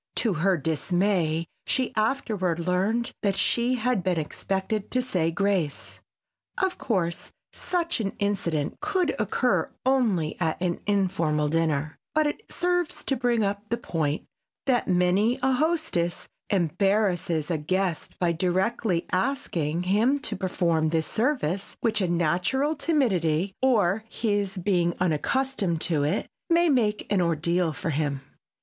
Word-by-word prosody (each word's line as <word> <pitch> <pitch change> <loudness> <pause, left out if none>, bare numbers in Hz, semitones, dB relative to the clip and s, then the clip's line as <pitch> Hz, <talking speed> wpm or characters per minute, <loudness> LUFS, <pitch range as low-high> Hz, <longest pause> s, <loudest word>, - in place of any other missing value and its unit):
To 225 -5 +1
her 180 +3 +2
dismay 165 +2 0 0.2
she 260 -2 0
afterward 215 -6 0
learned 190 +7 0
that 200 -2 +1
she 240 +4 +1
had 245 -3 0
been 180 -1 0
expected 195 +6 -2
to 255 - 0
say 185 -10 +1
grace. 175 -4 -1 0.6
Of 380 -1 0
course, 170 -7 -1 0.2
such 340 -5 -1
an 200 -3 -2
incident 175 -7 -1
could 360 -5 0
occur 220 +4 +1 0.2
only 220 -12 +1
at 160 - 0
an 175 -1 -1
informal 170 -7 +1
dinner, 155 -2 0 0.2
but 310 0 +4
it 295 +7 -2
serves 355 -2 -1
to 270 - 0
bring 240 -2 +1
up 205 +1 -2
the 235 - 0
point 160 -9 -2 0.4
that 255 -3 +2
many 185 +6 +3
a 265 - +3
hostess 305 - 0 0.2
embarrasses 180 -3 +1
a 160 - 0
guest 185 +2 -1
by 175 -2 +1
directly 185 +2 0
asking 180 - -1
him 215 +9 +3
to - - -3
perform 170 -4 +1
this 160 0 +1
service 215 - -1
which 220 -3 +1
a 185 - +1
natural 175 - +1
timidity 195 - +1
or 215 -6 +3
his 205 -3 -1
being 175 -2 +1
unaccustomed 185 - 0
to 160 -4 +1
it 145 +2 0 0.2
may 340 0 +4
make 220 -7 +1
an 195 - +3
ordeal 170 +1 +1
for 155 +2 -3
him. 145 -2 -1
190 Hz, 135 wpm, -26 LUFS, 170-235 Hz, 0.6 s, but